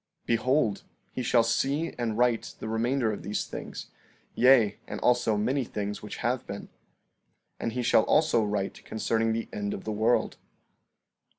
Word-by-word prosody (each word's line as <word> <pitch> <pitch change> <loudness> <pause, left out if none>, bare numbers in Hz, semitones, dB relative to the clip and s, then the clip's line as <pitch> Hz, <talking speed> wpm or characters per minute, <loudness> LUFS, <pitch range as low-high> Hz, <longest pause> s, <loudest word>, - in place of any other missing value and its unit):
14:21 - - -46
Behold, 115 -1 +1 0.3
he - - -4
shall 120 -1 +3
see 140 +8 0
and 115 -3 -1
write 120 -2 +1
the - - -6
remainder 115 +2 +1
of - - -6
these 105 - -2
things; - - -8 0.4
yea, 125 -5 +5
and - - -5
also 120 -3 +3
many 130 +6 +1
things 105 -3 -4
which 105 - -7
have 120 +1 0
been. 100 - -6
14:22 - - -14 0.9
And 115 - -2
he 125 0 -2
shall 115 -2 +4
also 155 -7 +3
write 100 -2 -3
concerning 110 +1 0
the 115 +1 -2
end 100 0 -2
of - - -8
the 110 - -3
world. 110 +3 +1
115 Hz, 170 wpm, -28 LUFS, 105-125 Hz, 0.9 s, yea